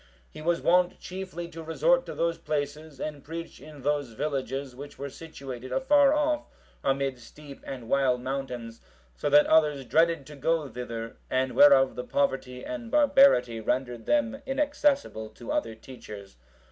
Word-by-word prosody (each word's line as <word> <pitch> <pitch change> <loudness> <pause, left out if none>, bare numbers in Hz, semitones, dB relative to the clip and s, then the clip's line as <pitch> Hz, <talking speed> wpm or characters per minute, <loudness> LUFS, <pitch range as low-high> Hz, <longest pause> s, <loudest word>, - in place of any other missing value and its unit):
He - - -10
was 170 +2 0
wont 180 +1 +3
chiefly 185 -2 -6
to 165 -1 -9
resort - - +2
to - - -6
those 170 0 0
places 150 -1 -4
and 150 -2 -5
preach 165 +2 -8
in 150 -2 -12
those 145 -4 -1
villages 135 0 -3
which 145 +2 -10
were 140 0 -6
situated 135 -6 -9
afar 280 +1 +4
off 300 0 +1 0.4
amid 135 -1 0
steep 140 +4 -13
and 125 -4 -7
wild 130 -1 +2
mountains, 125 -3 -5 0.3
so 145 - -2
that 145 +1 +7
others 150 -4 +3
dreaded 165 0 +2
to 150 +1 -11
go 155 +2 0
thither, 115 -2 -6
and 130 0 +1
whereof 135 -2 +6
the 125 - -4
poverty 130 -1 -1
and 275 -7 -6
barbarity 270 - +5
rendered 120 +1 -2
them 275 -2 +1
inaccessible 280 - 0
to 120 - -8
other 115 -1 -1
teachers. 105 - -11
145 Hz, 155 wpm, -27 LUFS, 130-170 Hz, 0.4 s, that